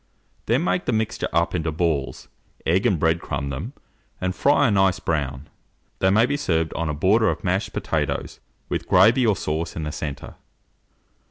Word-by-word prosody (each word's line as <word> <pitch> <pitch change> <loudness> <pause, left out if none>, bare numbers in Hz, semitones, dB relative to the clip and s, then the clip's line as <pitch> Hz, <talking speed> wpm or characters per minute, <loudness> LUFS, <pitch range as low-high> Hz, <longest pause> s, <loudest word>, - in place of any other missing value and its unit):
Then 125 +8 +2
make 180 - 0
the - - 0
mixture 110 0 -1
up 85 +2 +1
into 80 -2 -1
balls, 80 -4 -2 0.4
egg 90 +5 +2
and 95 - +2
bread 80 +2 +1
crumb 70 0 -3
them, 65 - -5 0.5
and 90 0 -1
fry 145 +5 +3
a - - +2
nice 95 -1 +3
brown. 70 -4 -2 0.5
They 95 - +3
may 110 +4 +4
be 140 +3 -1
served 80 - 0
on 85 -1 -2
a - - -1
border 105 +8 +3
of - - -3
mashed 95 +2 -1
potatoes, 75 -7 -2 0.3
with - - -3
gravy 115 +7 +5
or 105 - +3
sauce 80 -1 -3
in 80 - -4
the 75 - -3
centre. 75 -2 -6
90 Hz, 180 wpm, -23 LUFS, 80-105 Hz, 0.5 s, gravy